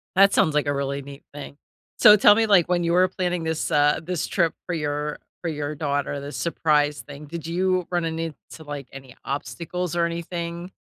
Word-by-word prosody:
that 195 +1 +6
sounds 155 - +3
like 145 -1 +1
a 145 - +1
really 140 0 -2
neat 140 0 -11
thing. 145 0 -9 0.4
So, 210 - +9
tell 205 0 +6
me, 225 - +3
like, 195 -6 +4
when 175 -1 +1
you 170 - +1
were 180 +1 +5
planning 180 -2 -2
this, 160 -1 -2
uh, 145 0 +3
this 175 -1 -2
trip 170 -4 +1
for 180 - -3
your 150 -1 -3 0.2
for 170 - -2
your 150 -1 -4
daughter, 145 -1 -2
the 140 +1 -7
surprise 150 -3 +1
thing. 145 +1 -11
Did 165 +2 -7
you 180 +1 0
run 175 -1 0
into 165 -1 -3 0.3
like 145 -3 -7
any 135 -2 -12
obstacles 160 +7 -4
or 170 - +2
anything? 170 +1 -4
160 Hz, 200 wpm, -24 LUFS, 145-175 Hz, 0.4 s, So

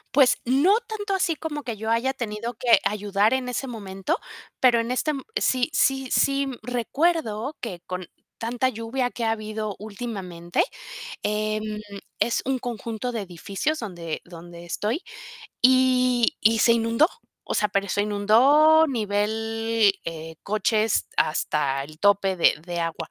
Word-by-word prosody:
Pues 270 -3 +6
no 285 - +4
tanto 415 -3 -3
así 350 -4 +1
como 295 -2 -5
que 235 - -4
yo 220 +1 -5
haya 240 +4 +1
tenido 230 -1 -4
que 235 -2 +4
ayudar 205 +1 +1
en 260 -1 -1
ese 250 +2 -2
momento, 195 -6 -3 0.4
pero 245 -2 +5
en 230 +2 -2
este, 255 +4 0
m 275 -3 -2 0.2
sí 255 +3 +2
sí 270 -2 +2
sí 275 0 +3
recuerdo 250 +1 -1
que 190 -7 -5
con 185 0 -4 0.3
tanta 245 +3 0
lluvia 245 +2 -2
que 240 - -6
ha 225 - +2
habido 215 -1 -4
últimamente, 195 -6 -3 0.6
em, 215 0 -2 0.4
es 235 - +1
un 265 0 0
conjunto 235 0 -4
de 230 -3 -3
edificios 195 - -3
donde 175 - -5
donde 175 0 -11
estoy, 215 - -2 0.6
y 255 -1 +4
y 225 +1 +4
se 235 - +6
inundó, 230 +6 +3 0.4
o - - -4
sea, 210 - +2
pero 200 0 -1
se 205 - +1
inundó 270 +10 +5
nivel, 225 -2 +1
eh, 160 0 -6
coches 215 +1 +1
hasta 140 -3 +1
el 155 +1 -14
tope 200 -2 +3
de 170 - +5
de 175 -1 -3
agua. 165 -1 -4
225 Hz, 150 wpm, -24 LUFS, 200-255 Hz, 0.6 s, Pues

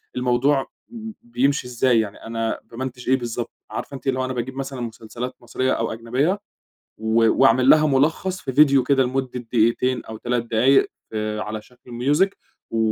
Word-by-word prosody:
الموضوع 125 +3 +2 0.2
ب 225 -2 -7
بيمشي 125 +3 0
إزاي، 125 -1 +2
يعني 105 -2 -3
أنا 115 0 -2
بامنتچ 125 0 -6
إيه 130 - +5
بالضبط 120 -1 -4 0.2
،عارفة 140 - -5
أنتِ 135 - -9
اللي 130 -1 +1
هو 130 - 0
أنا 130 - -3
باجيب 125 +2 -4
مثلًا 135 -2 -5
مسلسلات 115 +2 -6
مصرية 130 +2 -1
أو 115 -1 -1
أجنبية، 130 - 0 0.6
و 110 +1 +3
وأعمل 130 0 +4
لها 155 0 +7
ملخص 160 +7 +1
في 130 - -4
فيديو 140 -3 +6
كده 135 0 +3
لمدة 130 0 -2
دقيقتين 120 +2 +1
أو 110 0 -7
3 120 0 -1
دقايق 130 +5 +4 0.2
في 105 -1 -3
على 105 0 -4
شكل 125 +2 -18
music 145 +11 +2 0.4
و 115 - -1
125 Hz, 170 wpm, -22 LUFS, 115-135 Hz, 0.6 s, لها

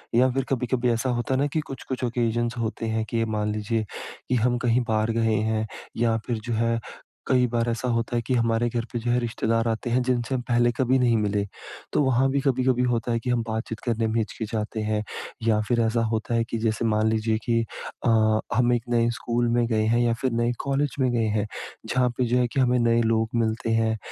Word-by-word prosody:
या 130 +2 +5
फिर 135 +1 0
कभी-कभी 125 -1 0
ऐसा 120 +3 0
होता 120 +2 -1
है 130 - +1
ना 145 - +2
कि 160 - +1
कुछ-कुछ 130 -1 -5
ऑकेज़न्स 120 0 0
होते 115 0 -3
हैं, 110 0 -1
के 115 -1 0
मान 105 -1 -1
लीजिए 110 +1 -1 0.4
कि 125 - +2
हम 120 +1 +2
कहीं 120 +1 +3
बाहर 110 0 +1
गए 110 -1 +2 0.2
हैं 110 0 -1 0.3
या 115 -1 +2
फिर 120 -2 -1
जो 120 - -2
है, 115 +1 +1 0.5
कई 125 -1 +4
बार 120 0 0
ऐसा 115 +2 -2
होता 115 0 0
है 120 - +1
कि 130 - +1
हमारे 115 -1 +2
घर 120 0 -2
पे 120 - -1
जो 120 +1 -1
है 125 - +3
रिश्तेदार 115 -1 0
आते 115 +1 -2
हैं, 125 +2 +2
जिनसे 125 0 0
हम 125 - -1
पहले 120 0 +3
कभी 130 0 +3
नहीं 120 -3 +3
मिले, 100 -1 0 0.5
तो - - +3
वहाँ 130 0 +3
भी 140 - +1
कभी-कभी 130 -2 +2
होता 120 -1 0
है 115 - +1
कि 125 - -4
हम 120 -1 +2
बातचीत 110 0 -3
करने 115 -1 0
में 110 - -2
हिचकिचाते 110 0 -3
हैं। 105 0 -1 0.4
या 110 -1 +4
फिर 120 -1 +2
ऐसा 115 +1 +1
होता 110 +1 -2
है 115 - +2
कि 115 - -2
जैसे 110 +1 0
मान 110 0 +2
लीजिए 110 0 +1
कि 115 -1 +2 0.4
अ, 110 -1 +4 0.2
हम 125 +1 +3
1 120 - 0
नए 120 -1 +3
स्कूल 120 0 0
में 120 0 +2
गए 110 -2 +1
हैं 115 +2 +2
या 120 -1 +2
फिर 130 -2 +1
नए 120 +1 +1
कॉलेज 140 0 0
में 130 -2 +2
गए 115 -2 +1
हैं, 105 0 -1 0.4
जहाँ 125 -1 +2
पे 125 - +2
जो 120 +2 +1
है 125 - +2
कि - - 0
हमें 125 -1 +3
नए 115 0 +3
लोग 110 0 +1
मिलते 115 0 0
हैं। 110 0 +2
115 Hz, 230 wpm, -25 LUFS, 110-125 Hz, 0.5 s, या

